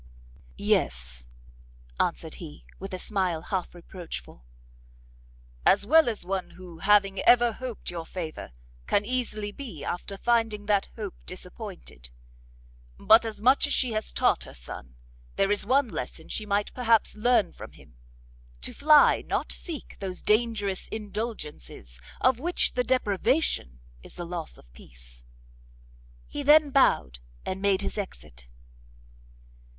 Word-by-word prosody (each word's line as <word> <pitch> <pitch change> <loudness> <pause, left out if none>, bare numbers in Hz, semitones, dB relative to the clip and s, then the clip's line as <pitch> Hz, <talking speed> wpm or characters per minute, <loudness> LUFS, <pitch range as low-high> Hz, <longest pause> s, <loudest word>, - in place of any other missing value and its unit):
"Yes," 60 0 0 0.7
answered - - -1
he, 75 -5 -10
with 195 +1 -7
a 185 - -3
smile 185 -4 0
half 185 -2 -3
reproachful, 170 - -9 1.2
"as 200 +1 +4
well 315 +3 +6
as 215 -6 -4
one 190 0 -2
who 175 -3 -12
having 195 0 +3
ever 240 0 +5
hoped 245 -3 -6
your 165 -2 -6
favour, 165 - -6 0.4
can 205 - +2
easily 220 -4 -2
be 210 - -8
after 195 +3 -4
finding 225 -2 +1
that 205 -1 +2
hope 210 -4 -5
disappointed. 180 - -9 0.9
But 225 +2 +6 0.2
much 260 +4 +5
as 285 - -1
she 255 -3 +1
has 215 0 -2
taught - - +2
her - - -10
son, - - -9 0.4
there 195 +1 +2
is 205 0 +1
one 265 +2 +3
lesson 160 - -6
she 215 - -3
might 205 0 0
perhaps 230 -3 +2
learn 215 -4 +2
from - - -10
him; - - -18 0.7
to - - -6
fly, 300 0 +6
not - - -1
seek, 330 -5 -6
those 190 -2 -5
dangerous 215 -3 +1
indulgences 205 - -6 0.2
of 255 -2 +3
which 345 +5 +2
the 250 - +1
deprivation 235 - 0 0.2
is - - -12
the 175 - -5
loss 170 -2 -5
of - - -17
peace!" - - -13 1.0
He 290 - -6
then 295 +1 +6
bowed, 65 - +3 0.3
and 190 +1 -4
made 200 -1 +2
his 210 - -3
exit. 75 - -8
200 Hz, 135 wpm, -27 LUFS, 170-235 Hz, 1.2 s, well